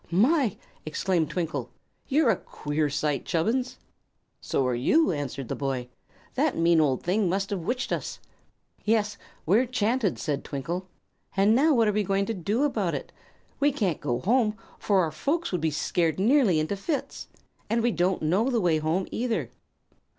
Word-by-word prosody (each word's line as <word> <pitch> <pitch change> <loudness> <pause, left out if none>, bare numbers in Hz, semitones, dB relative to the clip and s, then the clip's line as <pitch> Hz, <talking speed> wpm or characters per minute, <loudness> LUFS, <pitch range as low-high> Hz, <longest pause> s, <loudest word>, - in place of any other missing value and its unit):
"My!" 235 - +3 0.3
exclaimed 165 +1 0
Twinkle; 170 -2 -3 0.4
"you're 280 -3 +4
a - - +2
queer 150 0 -2
sight, 145 -1 -1
Chubbins!" 235 +10 0 0.6
"So 135 - -1
are 125 - +1
you," 245 - +3
answered 140 -4 -4
the - - -3
boy. 130 -3 -3 0.4
"That - - +1
mean 165 -1 +4
old 135 -4 +1
thing 190 +2 +1
must 195 +2 -1
have 200 - -1
'witched 245 +10 -2
us." - - -3 0.7
"Yes, 210 -1 +1 0.3
we're 220 +10 +3
'chanted," 230 -3 0
said 145 -3 -2
Twinkle. 170 +7 -4 0.5
"And 200 +3 +5
now, 290 +5 +4
what 230 -2 +4
are - - +3
we 210 - +2
going 195 0 0
to 225 - -2
do 210 - -1
about 290 - 0
it? - - -6 0.5
We 290 +1 +4
can't 200 - -1
go 120 0 -1
home, 220 - +2 0.2
for 195 -3 +2
our 165 -3 0
folks 305 - -1
would 180 -3 -1
be 160 - +2
scared 160 +2 0
nearly 220 - +4
into 155 +6 -1
fits. 280 - -4 0.4
And 230 +1 +1
we 240 - +3
don't 180 -2 0
know 190 +11 +2
the 240 -3 +1
way 170 -5 +2
home, 160 +5 0
either." 235 -1 -2
195 Hz, 170 wpm, -27 LUFS, 155-230 Hz, 0.7 s, And